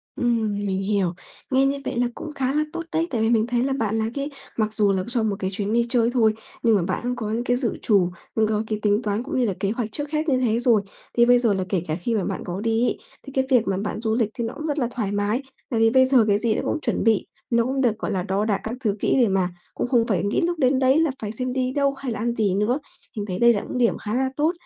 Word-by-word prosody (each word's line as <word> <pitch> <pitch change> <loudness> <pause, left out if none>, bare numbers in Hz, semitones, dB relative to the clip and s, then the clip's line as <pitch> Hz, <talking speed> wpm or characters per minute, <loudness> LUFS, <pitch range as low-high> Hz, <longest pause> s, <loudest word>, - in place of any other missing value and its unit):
Ừm, 230 -4 0
mình 190 -1 -1
hiểu. 195 -3 0 0.4
Nghe 265 +1 +4
như 280 +1 +1
vậy - - -3
là 245 - +2
cũng 310 - -7
khá 270 -1 -1
là 300 - +2
tốt 335 - -3
đấy. 325 +1 0
Tại 230 -4 -1
vì 225 - +2
mình 225 -1 +3
thấy 240 0 +1
là 270 +1 0
bạn 220 -1 0
là 220 0 0
cái 280 +2 -3 0.3
mặc 215 -1 0
dù 210 -2 +3
là 190 -1 0
cho 240 -1 0
một 210 -2 0
cái 190 -1 -1
chuyến 205 +2 -2
đi 235 0 +3
chơi 235 -1 +3
thôi 225 -4 +4 0.3
nhưng 230 -2 +5
mà 195 - +2
bạn - - -1
cũng 250 0 -1
có 220 -3 -4
những 235 +2 -1
cái 245 0 +1
dự 245 -3 0
trù, 195 -5 +3 0.3
cũng 220 -1 +3
có 215 0 0
cái 215 -1 -2
tính 210 +1 +2
toán 210 +2 -1
cũng 260 - -2
như 250 - +3
là 200 - 0
kế 195 - 0
hoạch 230 -2 -3
trước 290 +5 -4
hết 310 0 0
như 260 - +3
thế 235 -2 +1
rồi. 235 -4 +3 0.4
Thì 235 - +6
bây 245 0 +5
giờ 230 -4 +3
là 190 - -1
kể 185 -4 0
cả 155 - -1
khi 230 +5 -1
mà 200 - 0
bạn - - -3
có 180 +2 -4
đi 225 +2 +1
ấy, - - 0 0.3
thì 275 - -10
cái 265 -1 +1
việc 245 -3 +3
mà 190 - 0
bạn 210 +2 -3
du 220 -1 0
lịch 230 -3 +1
thì 235 - -4
nó 225 - -4
cũng 310 - -5
rất 295 0 -1
là 245 - +1
thoải 220 -5 -2
mái, 205 +4 0 0.3
tại 230 - 0
vì 225 0 +5
bây 260 +1 +5
giờ 255 -4 +5
cái 205 0 +3
gì 220 -1 +1
nó - - -1
cũng - - -1
chuẩn - - -1
bị, 220 -2 +3 0.2
nó 235 -1 +3
cũng 265 +2 -1
được, 220 -3 +1
gọi - - -3
là, 185 -3 -1
đo 195 +2 0
đạc 210 -3 +1
các 225 +2 -4
thứ 210 -3 +1
kỹ - - +1
để 235 - +4
mà 190 -2 +1 0.2
cũng - - -2
không 235 -2 +2
phải 200 -4 +1
nghĩ 200 - +1
lúc 345 -1 -1
đến 260 0 +3
đấy 265 +3 +4
là 325 -3 +2
phải 210 -1 -3
xem 255 +2 -3
đi 255 0 0
đâu 280 -1 +2
hay 270 -2 -5
là 220 - -4
ăn 235 +1 -1
gì 205 -4 +1
nữa. 225 +7 +1 0.4
Mình 205 - -2
thấy 185 -3 -4
đây 235 0 +6
là 205 - -1
những - - -5
điểm 235 -2 +2
khá 210 - -5
là 260 +2 +1
tốt. 300 +4 +2
230 Hz, 310 wpm, -23 LUFS, 210-255 Hz, 0.4 s, Thì